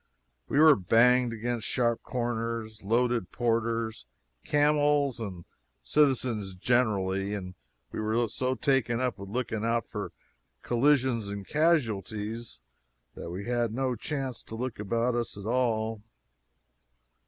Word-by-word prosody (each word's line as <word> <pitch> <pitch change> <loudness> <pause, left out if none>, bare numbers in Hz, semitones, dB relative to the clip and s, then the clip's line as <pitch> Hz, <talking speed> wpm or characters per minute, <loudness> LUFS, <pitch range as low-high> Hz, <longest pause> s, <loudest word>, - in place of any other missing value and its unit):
We - - 0
were 155 -1 +8
banged 120 +6 +4
against 115 0 -3
sharp 120 -2 +1
corners, 115 -3 -3
loaded 115 -1 +1
porters, 115 -1 -1 0.4
camels, 145 -3 +2
and 95 -6 -6 0.4
citizens 120 - +1
generally; 100 -3 +1
and 90 -2 -6 0.4
we - - -5
were 110 +2 +1
so 130 +4 -2
taken 125 -2 +1
up 125 -4 -1
with 100 0 -8
looking 110 -1 -2
out 115 -1 +1
for - - -5 0.5
collisions 125 -3 +2
and 100 -1 -6
casualties 115 - 0 0.5
that - - -7
we 95 +4 -5
had 120 -2 0
no 130 -1 0
chance 135 0 -4
to 110 - -9
look 125 -1 -4
about 115 +4 0
us 120 -3 -2
at 100 - -8
all. 115 -2 0
115 Hz, 125 wpm, -28 LUFS, 110-125 Hz, 0.5 s, were